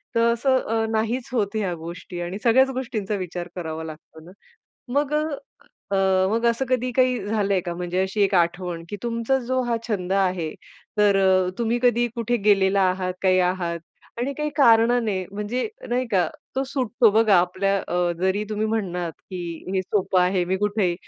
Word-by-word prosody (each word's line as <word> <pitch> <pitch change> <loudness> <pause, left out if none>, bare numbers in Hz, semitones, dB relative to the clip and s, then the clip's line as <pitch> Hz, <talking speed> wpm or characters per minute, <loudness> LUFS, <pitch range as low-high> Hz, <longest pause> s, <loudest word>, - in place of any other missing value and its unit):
तर 230 0 +4
असं 260 +3 +2
अ, 225 0 0
नाहीच 225 +3 -1
होत 210 -3 0
ह्या 200 -5 -1
गोष्टी, 170 +2 -8
आणि 175 +3 -4
सगळ्याच 260 +3 +5
गोष्टींचा 230 -6 -3
विचार 180 -1 -5
करावा 160 -3 -5
लागतो 160 0 -10
ना. 175 - -13 0.6
मग 285 +1 +1
अ, - - +3 0.7
अ, 200 - +1 0.3
मग 230 +2 0
असं 235 +3 +1
कधी 255 0 0
काही 255 0 +2
झालंय 200 -3 +1
का? 175 - -3
म्हणजे 180 +1 -2
अशी 190 +2 -2
एक 200 0 +2
आठवण 175 -1 0
की 205 - -5
तुमचा 235 +3 0
जो 260 0 +1
हा 240 -1 0
छंद 190 -4 -2
आहे, 185 -4 +1 0.5
तर 205 -1 +5
अ, 190 -1 +3
तुम्ही 235 0 +1
कधी 240 -1 +3
कुठे 240 0 0
गेलेला 200 -1 +4
आहात, 185 0 -2
काही 185 -1 +4
आहात 180 -2 -1 0.4
आणि 265 +3 -1
काही 300 0 -1
कारणाने 230 -6 +4
म्हणजे 210 - -2 0.2
नाही 250 +1 0
का, 180 -3 +3 0.3
तो 265 - +2
सुटतो? 250 -3 +2
बघा 215 -1 +4
आपल्या 190 +3 0
अ, 175 0 +1
जरी 190 +3 +1
तुम्ही 215 0 -1
म्हणालात, 180 -6 -2 0.2
की 185 -1 -5 0.3
हे 190 - +1
सोपं 190 -1 +1
आहे, 180 0 +2
मी 185 +2 0
कुठंय. 205 -3 0
200 Hz, 175 wpm, -23 LUFS, 180-235 Hz, 0.7 s, सगळ्याच